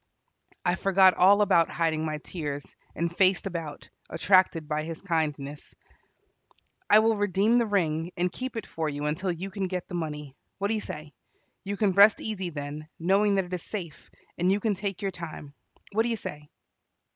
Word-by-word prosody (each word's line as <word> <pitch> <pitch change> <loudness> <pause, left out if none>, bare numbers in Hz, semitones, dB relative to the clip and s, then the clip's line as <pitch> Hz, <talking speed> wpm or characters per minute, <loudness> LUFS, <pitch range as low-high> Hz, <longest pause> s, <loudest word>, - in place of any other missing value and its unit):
I 175 - +3
forgot 190 0 +5
all 200 +3 +5
about 170 -5 +4
hiding 160 -2 0
my 155 -1 -2
tears, 145 -5 -6 0.2
and 170 +1 -2
faced 190 0 +3
about, 165 -6 -5 0.2
attracted 170 -1 +3
by 150 0 -1
his 160 +1 -6
kindness. 150 -5 -3 1.1
"I 210 - +8
will 220 +1 +4
redeem 205 +3 +2
the 235 - +1
ring, 165 -5 0
and 180 0 +1
keep 255 +3 -5
it 225 - -4
for 160 -1 -3
you 145 0 -4
until 175 +5 -1
you 185 +3 -5
can 190 0 -2
get 180 -1 -4
the - - -10
money. 150 -5 -4 0.2
What 200 +1 -1
do - - +1
you 215 - -1
say? 150 -4 -8 0.5
You 200 +1 -4
can 205 -2 +2
rest 200 +3 +6
easy 190 -5 -3
then, 150 0 -6
knowing 200 +4 +3
that 195 -1 +1
it 180 - -9
is 180 - -2
safe, 175 -7 -7 0.3
and 180 +2 +3
you 200 - +2
can 215 0 +1
take 195 0 -4
your 195 - 0
time. 160 -5 -8 0.4
What 215 +2 +2
do 235 - 0
you 230 - -1
say?" 150 -6 -7
180 Hz, 190 wpm, -27 LUFS, 155-200 Hz, 1.1 s, I